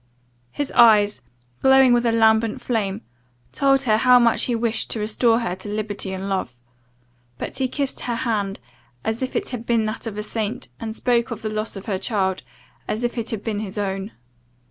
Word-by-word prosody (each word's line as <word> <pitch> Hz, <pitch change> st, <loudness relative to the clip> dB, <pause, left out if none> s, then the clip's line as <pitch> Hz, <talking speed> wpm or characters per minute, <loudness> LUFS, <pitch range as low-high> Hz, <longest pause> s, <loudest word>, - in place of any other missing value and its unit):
His 290 Hz, -2 st, -3 dB
eyes, 210 Hz, -4 st, +5 dB, 0.4 s
glowing 265 Hz, -1 st, +6 dB
with 240 Hz, 0 st, +2 dB
a -, -, +3 dB
lambent 220 Hz, +1 st, +3 dB
flame, 220 Hz, -4 st, -2 dB, 0.5 s
told 275 Hz, -1 st, +2 dB
her 215 Hz, -4 st, +3 dB
how 250 Hz, +2 st, +6 dB
much 235 Hz, -2 st, +3 dB
he 245 Hz, -, 0 dB
wished 225 Hz, -1 st, -1 dB
to 225 Hz, -, -2 dB
restore 225 Hz, +2 st, +2 dB
her 180 Hz, -6 st, -2 dB
to 195 Hz, +2 st, -8 dB
liberty 205 Hz, -2 st, -3 dB
and 190 Hz, +1 st, -4 dB
love; 185 Hz, -11 st, -3 dB, 0.8 s
but -, -, -5 dB
he 260 Hz, -, +1 dB
kissed 275 Hz, +1 st, -3 dB
her 240 Hz, -1 st, -2 dB
hand, 210 Hz, -5 st, -2 dB, 0.4 s
as 220 Hz, +2 st, -2 dB
if 260 Hz, -, -3 dB
it -, -, -1 dB
had 245 Hz, -3 st, -5 dB
been 230 Hz, -2 st, +1 dB
that 215 Hz, +2 st, -3 dB
of 210 Hz, -2 st, -5 dB
a 210 Hz, -, -3 dB
saint; 225 Hz, +3 st, -3 dB
and 220 Hz, -2 st, -5 dB
spoke 235 Hz, -2 st, +1 dB
of 230 Hz, -2 st, -6 dB
the 215 Hz, -, -2 dB
loss 215 Hz, +1 st, -3 dB
of 195 Hz, -, -8 dB
her 195 Hz, -3 st, -2 dB
child, 190 Hz, -4 st, -1 dB, 0.5 s
as 220 Hz, +3 st, -2 dB
if 240 Hz, -, -1 dB
it 230 Hz, -2 st, -4 dB
had 215 Hz, -3 st, -4 dB
been 215 Hz, -3 st, -2 dB
his 210 Hz, -1 st, -5 dB
own. 195 Hz, 0 st, -2 dB
225 Hz, 200 wpm, -22 LUFS, 205-240 Hz, 0.8 s, glowing